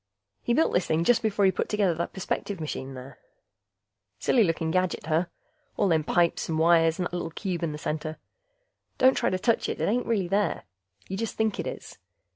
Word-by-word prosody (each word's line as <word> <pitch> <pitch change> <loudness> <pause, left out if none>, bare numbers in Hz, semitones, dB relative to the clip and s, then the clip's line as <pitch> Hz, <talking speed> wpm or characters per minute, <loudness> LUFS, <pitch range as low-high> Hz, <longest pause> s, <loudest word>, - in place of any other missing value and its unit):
He 235 - 0
built 320 - +2
this 180 - +1
thing 160 +1 +1
just 240 +7 +3
before 210 -2 +1
he 190 - +5
put - - -3
together 205 -4 +2
the 170 +1 -2
perspective 190 0 -4
machine 135 -4 -5
there. 130 +1 -10 1.0
Silly 235 - +3
looking 165 -3 0
gadget, 185 -2 0
huh? 160 +3 +1 0.5
All 200 - +2
them 160 -2 +2
pipes 170 +2 +1
and 160 - 0
wires 165 0 +4
and 180 - -1
that 175 - -5
little 175 -2 -3
cube 180 +1 -4
in 165 -2 -1
the 150 - -5
center... 155 +1 -4 0.8
don't 260 +1 +6
try - - +1
to 185 - 0
touch 230 +4 +1
it, - - -3
it - - 0
ain't 240 +4 0
really 205 -6 +1
there. 200 +3 0 0.4
You 190 - -4
just 225 +1 -3
think 220 -2 0
it - - -2
is. - - -8
175 Hz, 210 wpm, -27 LUFS, 160-205 Hz, 1.0 s, don't